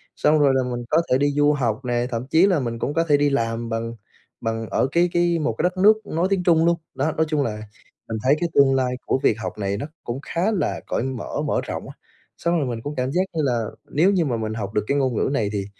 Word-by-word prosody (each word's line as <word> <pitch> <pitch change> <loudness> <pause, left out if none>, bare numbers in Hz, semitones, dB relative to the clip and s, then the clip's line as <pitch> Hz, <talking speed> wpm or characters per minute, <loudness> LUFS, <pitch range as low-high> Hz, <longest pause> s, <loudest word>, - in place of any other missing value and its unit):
Xong 150 +1 +3
rồi 140 -2 +4
là 130 - +2
mình 120 -1 -4
có 160 +2 +4
thể 130 - +5
đi 145 +1 +2
du 145 +1 +3
học 125 -2 -1
nè, 120 0 0
thậm 120 +3 -3
chí 165 +6 +4
là 180 -6 +2
mình 115 -2 -3
cũng 145 - -2
có 165 +1 +2
thể 145 - +6
đi 145 0 +2
làm 115 -3 -1
bằng 115 +1 -3 0.5
bằng 115 0 -3
ở - - +1
cái 175 +2 +3
cái 175 -1 +2
một 115 -7 -1
cái - - -1
đất 180 +1 0
nước 215 +3 +4
nói 170 +4 0
tiếng 185 -2 +1
Trung 165 -2 +4
luôn. 170 0 +3 0.2
Đó, 145 +4 0
nói 160 - +3
chung 150 -2 +1
là 105 -3 -3 0.5
mình 110 - -2
thấy 135 +3 +4
cái 175 - -1
tương 135 -1 +5
lai 125 -1 0
của 130 - +1
việc 110 - +3
học 110 - -5
này 100 -1 -2
nó 130 - -4 0.2
cũng 120 +3 -4
khá 180 +8 -1
là 200 - -1
cởi - - -1
mở, 130 -2 -4
mở - - 0
rộng - - -5
á. - - -11 0.4
Xong 170 0 0
rồi 145 - 0
mình 115 -2 -4
cũng 145 +3 -5
cảm 130 +1 -1
giác 180 +5 +2
như 160 - 0
là 120 -4 0 0.2
nếu 170 +7 +3
như 180 -5 +2
mà 120 -4 -1
mình 110 -1 -3
học 105 -2 -5
được 105 - +1
cái 140 - +1
ngôn 130 -4 +1
ngữ - - +1
này 110 -6 0
thì 100 -1 -2
135 Hz, 275 wpm, -23 LUFS, 115-165 Hz, 0.5 s, thể